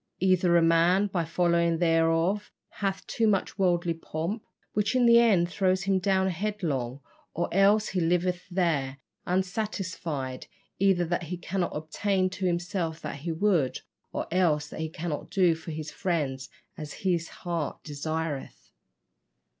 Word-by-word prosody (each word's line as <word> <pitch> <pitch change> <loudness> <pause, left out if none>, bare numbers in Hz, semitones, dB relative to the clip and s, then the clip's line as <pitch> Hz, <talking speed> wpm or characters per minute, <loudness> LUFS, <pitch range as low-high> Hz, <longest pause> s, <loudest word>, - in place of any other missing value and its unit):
Either 180 -2 +4
a 170 - +4
man, 170 +4 +4
by 185 -4 -1
following 170 0 +2
thereof, 165 +4 +2 0.2
hath 195 -2 -3
too 225 - +1
much 200 0 0
worldly 175 -2 +2
pomp, 165 +6 -4 0.3
which 210 +4 0
in 250 -1 +4
the 235 0 +7
end 200 -8 +4
throws 185 +1 +1
him 195 -1 +2
down 190 0 +2
headlong, 165 - -2 0.3
or 170 - 0
else 205 +3 +4
he 185 - -1
liveth 180 +1 0
there 160 -7 0 0.3
unsatisfied, 180 - -2 0.3
either 190 -2 +3
that 175 +2 -1
he 180 - -3
cannot 175 +1 -2
obtain 185 +5 0
to 190 0 -2
himself 175 -2 -2
that - - -5
he 165 +4 -4
would, 165 -6 +1 0.3
or - - -3
else 155 -5 +2
that - - -8
he 160 0 -2
cannot 160 -1 -4
do 180 -3 +3
for 160 +1 -9
his 155 -1 -5
friends 140 -7 -2 0.3
as 150 -2 -7
his 170 -3 +1
heart 170 -5 -4
desireth." 155 0 -4
175 Hz, 145 wpm, -28 LUFS, 160-190 Hz, 0.3 s, the